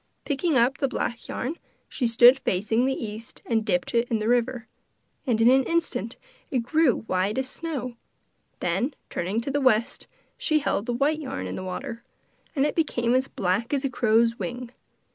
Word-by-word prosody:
Picking 295 +1 +1
up 255 +3 +3
the 275 - +2
black 235 -2 -3
yarn, 290 +7 -3 0.3
she 250 - -1
stood 240 +3 +7
facing 220 +4 +1
the 265 - 0
east 220 0 -7
and 225 -2 +1
dipped 180 -2 -1
it 235 0 +1
in 230 - +1
the 215 0 -2
river, 240 0 +1 0.6
and 230 -3 +2
in 225 - +5
an 265 +2 +6
instant 325 - -1 0.3
it 250 -3 0
grew 310 0 +2
white 195 +1 -1
as 265 0 -1
snow, 260 -6 -4 0.6
then 195 - 0 0.2
turning 195 +6 -1
to 275 - -4
the 285 +1 0
west, 235 -4 +2 0.3
she 310 - +2
held 270 -6 -1
the - - 0
white 285 +5 +1
yarn 270 -3 -5
in - - -4
the 185 - -5
water, 230 +6 -5 0.5
and 275 -1 +3
it 300 - 0
became 240 -7 +1
as 260 +1 +2
black 195 +9 -1
as 275 0 -1
a 270 - -1
crow's 230 0 +2
wing. 245 -1 -5
245 Hz, 185 wpm, -25 LUFS, 225-270 Hz, 0.6 s, stood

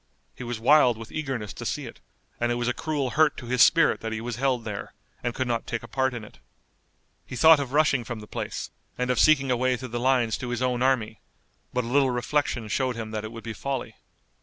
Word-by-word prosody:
He - - -9
was 120 -2 -4
wild 125 -1 +5
with 115 0 -10
eagerness 130 -9 -4
to - - -8
see - - -3
it, - - -10 0.4
and 120 0 +1
it - - +1
was 120 0 -2
a 125 - +1
cruel 145 -4 -2
hurt 155 -1 +3
to 120 - -8
his 125 0 +1
spirit 165 +5 +5
that 115 - -4
he 110 - -3
was 115 0 -5
held 125 -3 0
there, 105 -3 -6 0.3
and 120 -1 -3
could 130 - -1
not 115 -1 -2
take 115 -1 -3
a - - -9
part 130 +2 0
in 115 - -6
it. 105 - -14 0.8
He - - -8
thought 160 +3 +7
of 135 -3 -4
rushing 145 -4 +3
from 115 0 -6
the 105 - -10
place, - - -5 0.3
and 125 0 0
of 125 - 0
seeking 135 -4 +4
a - - +3
way 130 +1 +1
through 130 +1 -7
the 120 +1 -3
lines 125 -3 +2
to 125 - -5
his 120 +1 -2
own 125 -1 0
army, 125 -5 +1 0.5
but 125 - -1
a - - -6
little 135 +2 +3
reflection 125 -1 -1
showed 130 +4 0
him 110 -1 -6
that 110 -1 -3
it 110 - -6
would 115 0 -9
be 115 - -5
folly. 135 +3 -4
125 Hz, 250 wpm, -26 LUFS, 115-135 Hz, 0.8 s, thought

